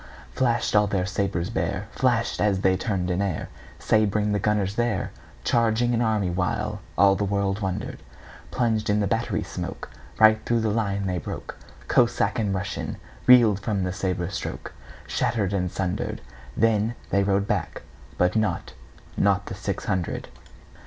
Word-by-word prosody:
Flash'd 120 Hz, -4 st, +1 dB
all 105 Hz, 0 st, +5 dB
their 95 Hz, -2 st, 0 dB
sabres 95 Hz, -3 st, -1 dB
bare, 95 Hz, +5 st, -2 dB
Flash'd 120 Hz, -2 st, +1 dB
as 100 Hz, -2 st, +2 dB
they 95 Hz, -1 st, +3 dB
turn'd 95 Hz, -3 st, -1 dB
in 90 Hz, -, 0 dB
airSabring 105 Hz, +3 st, -1 dB
the 105 Hz, -, +1 dB
gunners 100 Hz, -1 st, +1 dB
there, 120 Hz, -4 st, -1 dB, 0.3 s
Charging 115 Hz, +1 st, +2 dB
an 115 Hz, -, +1 dB
army, 110 Hz, -5 st, +1 dB
whileAll 90 Hz, 0 st, -1 dB, 0.4 s
the -, -, +1 dB
world 100 Hz, 0 st, 0 dB
wonder'd:Plunged 110 Hz, +3 st, -3 dB
in 105 Hz, 0 st, +3 dB
the 105 Hz, -, +1 dB
battery 115 Hz, +3 st, 0 dB
smokeRight 110 Hz, 0 st, 0 dB
thro' 120 Hz, -, +1 dB
the 110 Hz, -1 st, 0 dB
line 100 Hz, -2 st, -1 dB
they 90 Hz, -2 st, -1 dB
broke; -, -, -6 dB, 0.3 s
Cossack 120 Hz, -1 st, +2 dB
and 105 Hz, -3 st, 0 dB
RussianReel'd 100 Hz, -, +2 dB
from 100 Hz, -1 st, -1 dB
the 90 Hz, 0 st, -2 dB
sabre 90 Hz, -3 st, -2 dB
strokeShatter'd 115 Hz, -6 st, -3 dB
and 90 Hz, -2 st, 0 dB
sunder'd. 90 Hz, -2 st, -2 dB, 0.4 s
Then 115 Hz, +1 st, +2 dB, 0.2 s
they 100 Hz, -, +3 dB
rode 100 Hz, 0 st, +1 dB
back, -, -, -2 dB, 0.3 s
but 90 Hz, 0 st, +3 dB
notNot 105 Hz, -5 st, -1 dB, 0.7 s
the -, -, -6 dB
six -, -, -4 dB
hundred. 90 Hz, -3 st, -2 dB
100 Hz, 140 wpm, -25 LUFS, 95-110 Hz, 0.7 s, all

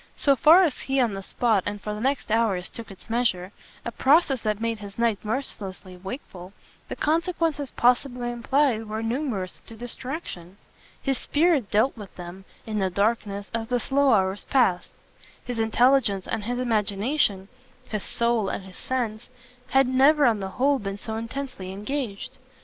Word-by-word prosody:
So 280 Hz, -2 st, +3 dB
far 330 Hz, +7 st, +7 dB
as 310 Hz, -7 st, 0 dB
he 270 Hz, 0 st, 0 dB
on 235 Hz, -5 st, +2 dB
the 195 Hz, -, -5 dB
spot 220 Hz, +1 st, +1 dB
and 205 Hz, -, -3 dB
for 210 Hz, +1 st, -4 dB
the 210 Hz, -, -5 dB
next 270 Hz, -2 st, -1 dB
hours 215 Hz, -5 st, +1 dB
took 230 Hz, -1 st, -9 dB
its 195 Hz, -, -14 dB
measure 220 Hz, -6 st, 0 dB, 0.3 s
a 235 Hz, -, -3 dB
process 275 Hz, -1 st, +3 dB
that 215 Hz, -1 st, -1 dB
made 230 Hz, -1 st, -2 dB
his 200 Hz, -1 st, -10 dB
night 230 Hz, -3 st, +1 dB
mercilessly 205 Hz, -5 st, -5 dB
wakeful 190 Hz, -2 st, -8 dB, 0.4 s
the -, -, -4 dB
consequences 325 Hz, -3 st, 0 dB
possibly 245 Hz, 0 st, +1 dB
implied 240 Hz, -1 st, +1 dB
were 220 Hz, +1 st, -3 dB
numerous 225 Hz, -6 st, -3 dB
to 225 Hz, -, -10 dB
distraction. 240 Hz, -, -7 dB, 0.5 s
His 270 Hz, -2 st, 0 dB
spirit 300 Hz, -, +2 dB
dealt 220 Hz, +6 st, +2 dB
with 205 Hz, -4 st, -11 dB
them, 180 Hz, +2 st, -9 dB, 0.2 s
in 215 Hz, -1 st, -2 dB
the 190 Hz, -1 st, +1 dB
darkness, 200 Hz, 0 st, -1 dB
as 225 Hz, -1 st, -2 dB
the 245 Hz, 0 st, +1 dB
slow 275 Hz, +3 st, +2 dB
hours 195 Hz, -2 st, +2 dB
passed; 215 Hz, -10 st, +2 dB, 0.6 s
his 245 Hz, -2 st, -4 dB
intelligence 225 Hz, -3 st, +3 dB
and 215 Hz, -2 st, -3 dB
his 245 Hz, +2 st, -2 dB
imagination, 210 Hz, -2 st, 0 dB, 0.4 s
his 215 Hz, -2 st, -3 dB
soul 235 Hz, -3 st, 0 dB
and -, -, -4 dB
his 190 Hz, -1 st, -13 dB
sense, 240 Hz, -3 st, -3 dB, 0.4 s
had 270 Hz, -1 st, +4 dB
never 280 Hz, +3 st, +5 dB
on 225 Hz, -4 st, +3 dB
the 190 Hz, -1 st, -4 dB
whole 275 Hz, +1 st, +3 dB
been 195 Hz, -1 st, -4 dB
so 220 Hz, +2 st, -6 dB
intensely 230 Hz, -4 st, -5 dB
engaged. 250 Hz, +3 st, -4 dB
230 Hz, 165 wpm, -25 LUFS, 200-265 Hz, 0.6 s, far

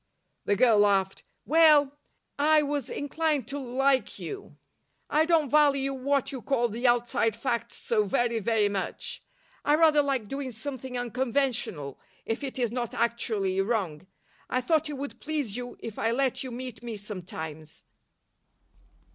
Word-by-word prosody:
The 205 Hz, -, +2 dB
girl 225 Hz, -1 st, +5 dB
laughed. 195 Hz, -2 st, +2 dB, 0.2 s
"Well, 305 Hz, -3 st, +6 dB, 0.5 s
I 305 Hz, +1 st, +5 dB
was 285 Hz, -3 st, -2 dB
inclined 290 Hz, -2 st, -1 dB
to 285 Hz, +1 st, -3 dB
like 265 Hz, +1 st, +1 dB
you. 405 Hz, -1 st, -8 dB, 0.5 s
I 310 Hz, +1 st, +4 dB
don't 325 Hz, -5 st, +2 dB
value 280 Hz, -2 st, +3 dB
what 275 Hz, +1 st, 0 dB
you 265 Hz, -3 st, -6 dB
call 240 Hz, -3 st, +1 dB
the 235 Hz, +4 st, 0 dB
outside 240 Hz, -2 st, +2 dB
facts 235 Hz, 0 st, -2 dB
so 215 Hz, -3 st, +1 dB
very, 235 Hz, +3 st, +1 dB
very 220 Hz, 0 st, +2 dB
much. 475 Hz, -, -4 dB, 0.4 s
I 295 Hz, -, +4 dB
rather 310 Hz, -2 st, +5 dB
like 270 Hz, -6 st, -1 dB
doing 275 Hz, +2 st, -4 dB
something 255 Hz, +2 st, -6 dB
unconventional, 245 Hz, -, -1 dB, 0.3 s
if 225 Hz, +6 st, -3 dB
it 270 Hz, -1 st, -4 dB
is 240 Hz, -3 st, 0 dB
not 240 Hz, -2 st, -3 dB
actually 210 Hz, -5 st, 0 dB
wrong. 190 Hz, -6 st, -2 dB, 0.4 s
I 255 Hz, -, +1 dB
thought 315 Hz, +4 st, +1 dB
it -, -, -4 dB
would 280 Hz, +1 st, -6 dB
please 295 Hz, -9 st, -2 dB
you 245 Hz, 0 st, -6 dB
if 225 Hz, -2 st, -7 dB
I 225 Hz, -, +1 dB
let 260 Hz, +2 st, 0 dB
you 260 Hz, -, -5 dB
meet 250 Hz, -1 st, -7 dB
me 235 Hz, -3 st, -6 dB
sometimes." 160 Hz, -6 st, -8 dB
250 Hz, 150 wpm, -28 LUFS, 220-285 Hz, 0.5 s, Well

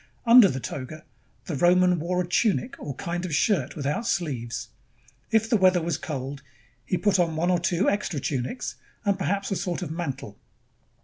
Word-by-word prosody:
Under 235 Hz, -2 st, +9 dB
the 135 Hz, -7 st, -2 dB
toga, 140 Hz, +6 st, -6 dB, 0.4 s
the 170 Hz, -, -3 dB
Roman 180 Hz, +3 st, +4 dB
wore 180 Hz, +3 st, 0 dB
a -, -, -8 dB
tunic, 225 Hz, +6 st, +1 dB
or 140 Hz, -, -6 dB
kind 175 Hz, +4 st, -4 dB
of 170 Hz, -5 st, -2 dB
shirt 160 Hz, -, +1 dB
without 150 Hz, -, -2 dB
sleeves. 120 Hz, -, -2 dB, 0.6 s
If 225 Hz, 0 st, +2 dB
the 225 Hz, -, +3 dB
weather 185 Hz, -2 st, +4 dB
was 165 Hz, -2 st, -2 dB
cold, 140 Hz, -2 st, -5 dB, 0.4 s
he 180 Hz, -, -1 dB
put 200 Hz, -1 st, +2 dB
on 165 Hz, -2 st, +1 dB
one 175 Hz, +3 st, +1 dB
or 180 Hz, -, +2 dB
two 175 Hz, +3 st, +1 dB
extra 200 Hz, -6 st, 0 dB
tunics, 135 Hz, -, -3 dB, 0.3 s
and 200 Hz, -1 st, +3 dB
perhaps 195 Hz, +2 st, -1 dB
a -, -, +1 dB
sort 180 Hz, -1 st, -3 dB
of 160 Hz, -, -5 dB
mantle. 165 Hz, -5 st, -5 dB
175 Hz, 180 wpm, -26 LUFS, 145-195 Hz, 0.6 s, Under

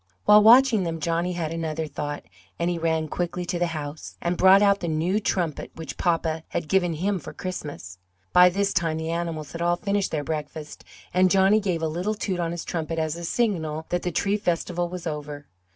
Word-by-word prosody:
While 210 Hz, 0 st, +8 dB
watching 235 Hz, 0 st, +7 dB
them 165 Hz, -1 st, -3 dB
Johnny 170 Hz, +3 st, -1 dB
had 165 Hz, -2 st, -3 dB
another 160 Hz, -1 st, -3 dB
thought, 145 Hz, 0 st, -5 dB, 0.3 s
and 170 Hz, +1 st, 0 dB
he 170 Hz, -, -2 dB
ran 160 Hz, -1 st, 0 dB
quickly 175 Hz, +2 st, -3 dB
to 175 Hz, 0 st, -2 dB
the 175 Hz, -, +1 dB
house, 155 Hz, -2 st, -6 dB
and 175 Hz, +1 st, -1 dB
brought 190 Hz, +3 st, +6 dB
out 200 Hz, -1 st, +4 dB
the 175 Hz, -, -4 dB
new 165 Hz, +6 st, 0 dB
trumpet 175 Hz, -7 st, -2 dB
which 160 Hz, -4 st, -7 dB
papa 165 Hz, -2 st, 0 dB
had 170 Hz, -, -3 dB
given 175 Hz, 0 st, +2 dB
him 190 Hz, +4 st, -1 dB
for -, -, -9 dB
Christmas. 145 Hz, -, -7 dB, 0.3 s
By 180 Hz, 0 st, +8 dB
this 200 Hz, +2 st, 0 dB
time 165 Hz, -4 st, 0 dB
the 160 Hz, +1 st, -3 dB
animals 165 Hz, -3 st, -3 dB
had 170 Hz, -, -6 dB
all 175 Hz, 0 st, +2 dB
finished 200 Hz, +1 st, -1 dB
their 150 Hz, -2 st, -2 dB
breakfast 150 Hz, 0 st, -6 dB, 0.3 s
and 185 Hz, +1 st, +4 dB
Johnny 195 Hz, +3 st, +4 dB
gave 180 Hz, -5 st, -2 dB
a -, -, +2 dB
little 180 Hz, +7 st, -2 dB
toot 190 Hz, -3 st, -3 dB
on 170 Hz, -1 st, -1 dB
his 170 Hz, 0 st, -5 dB
trumpet 165 Hz, -1 st, -3 dB
as 160 Hz, -1 st, -1 dB
a 170 Hz, -, -7 dB
signal 160 Hz, -7 st, -1 dB
that 175 Hz, 0 st, 0 dB
the 180 Hz, -, -2 dB
tree 200 Hz, +5 st, +1 dB
festival 175 Hz, -2 st, -1 dB
was 180 Hz, -1 st, -7 dB
over. 150 Hz, -2 st, -5 dB
170 Hz, 210 wpm, -25 LUFS, 160-185 Hz, 0.3 s, While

